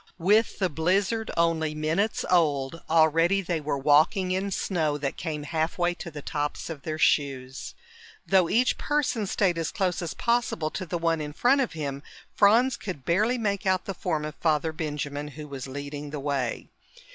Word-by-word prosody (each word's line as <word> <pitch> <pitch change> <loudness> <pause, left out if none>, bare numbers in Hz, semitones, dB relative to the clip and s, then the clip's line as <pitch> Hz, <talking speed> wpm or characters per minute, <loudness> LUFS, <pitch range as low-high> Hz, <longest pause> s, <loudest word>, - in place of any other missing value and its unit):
With 205 +6 +3
the 190 - +1
blizzard 190 +8 0
only 160 -2 +1
minutes 160 +8 0
old, 155 -3 +1
already 165 +4 +4
they 170 -3 -2
were 145 -1 -1
walking 155 +7 +3
in 190 +2 -1
snow 160 -6 -1
that 140 -2 -3
came 155 -3 -4
halfway 165 +3 0
to 175 - -8
the 145 -3 -9
tops 150 +2 -3
of 150 -4 -7
their 155 +2 -4
shoes. 135 -4 0 0.5
Though 185 -3 +3
each 250 +3 +2
person 270 -8 0
stayed 180 -3 +1
as 165 - -1
close 185 -3 -1
as 170 -2 -4
possible 235 -10 0
to 185 - -5
the 175 - -2
one 165 -1 0
in 150 0 -5
front 265 - +3
of 255 - -2
him, 140 -3 -4 0.3
Franz 235 +5 +4
could 175 - -7
barely 215 +9 +2
make 200 -4 -1
out 185 -1 +2
the 195 - -3
form 155 -3 -2
of 150 - -5
Father 160 0 +1
Benjamin, 150 -2 -4
who 150 +1 -9
was 135 -2 -6
leading 145 +2 -6
the 150 0 -5
way. 135 -4 -2
165 Hz, 180 wpm, -26 LUFS, 150-190 Hz, 0.5 s, already